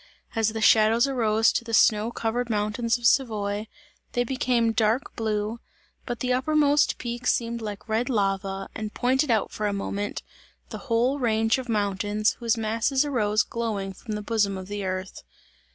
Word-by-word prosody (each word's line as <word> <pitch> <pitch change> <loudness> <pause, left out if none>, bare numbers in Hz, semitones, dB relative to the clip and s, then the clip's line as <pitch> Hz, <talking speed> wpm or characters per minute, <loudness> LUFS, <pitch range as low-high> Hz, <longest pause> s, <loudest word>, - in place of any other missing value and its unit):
As 225 -1 +2
the 220 - -4
shadows 220 +3 +5
arose 225 -4 +2
to - - -1
the 230 -1 -1
snow 215 +1 +4
covered 235 +1 -2
mountains 225 +3 0
of 240 - -8
Savoy, 215 -5 +1 0.5
they 245 - +1
became 245 -2 +1
dark 225 +3 0
blue, 215 0 -2 0.5
but 240 -2 -4
the 250 0 +1
uppermost 290 +2 +2
peak 240 0 -5
seemed 235 0 0
like 210 -1 -6
red 225 +3 0
lava 195 -3 -1
and 215 -1 -6
pointed 260 +3 +1
out 220 -3 +1
for 210 - -2
a 205 - -1
moment, 200 +1 -3 0.5
the - - -6
whole 245 +5 +2
range 225 -1 +2
of 255 -2 -7
mountains, 205 0 0
whose 230 -2 +1
masses 230 +6 +1
arose 215 -6 +1
glowing 210 -5 -3
from 215 +3 -6
the 210 - -5
bosom 205 -3 0
of 185 +1 -8
the 205 -1 -4
earth. 185 0 -4
225 Hz, 170 wpm, -25 LUFS, 210-240 Hz, 0.5 s, shadows